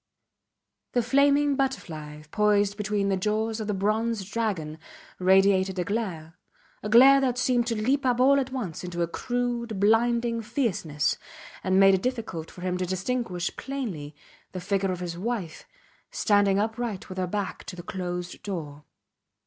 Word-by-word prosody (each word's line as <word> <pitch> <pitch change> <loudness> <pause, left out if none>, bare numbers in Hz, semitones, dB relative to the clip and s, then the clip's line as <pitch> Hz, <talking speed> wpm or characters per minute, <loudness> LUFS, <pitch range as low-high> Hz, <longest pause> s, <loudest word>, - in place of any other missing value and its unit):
The 245 - +2
flaming 280 +3 +3
butterfly 155 - -3
poised 205 -1 +2
between 205 -1 -1
the 195 - +1
jaws 215 +3 -1
of 215 - -4
the 210 - 0
bronze 215 +1 0
dragon 190 -9 -2 0.4
radiated 190 0 +4
a 180 - +1
glare, 180 -6 -4 0.4
a 210 - -4
glare 265 +5 +8
that 250 -2 0
seemed 245 -1 +1
to 230 -3 -1
leap 265 +6 +1
up 250 -2 +1
all 275 +2 +5
at 265 -1 -3
once 210 -13 -4
into 175 -1 -2
a - - -1
crude, 240 +1 -2
blinding 230 +2 +2
fierceness, 195 - -1 0.4
and 190 0 +3
made 195 0 +7
it 190 - +2
difficult 225 -10 -3
for 180 - -12
him 180 0 -1
to 185 - 0
distinguish 185 -1 -2
plainly 195 - -5 0.4
the 185 - -4
figure 195 +1 0
of 180 -1 -4
his 170 -1 -5
wife 200 -6 -4 0.4
standing 205 -2 +2
upright 220 -1 -2
with 185 0 -6
her 185 - 0
back 200 +1 -3
to 180 - -7
the 175 - -8
closed 180 -1 -5
door. 150 -7 -6
205 Hz, 160 wpm, -26 LUFS, 180-235 Hz, 0.4 s, glare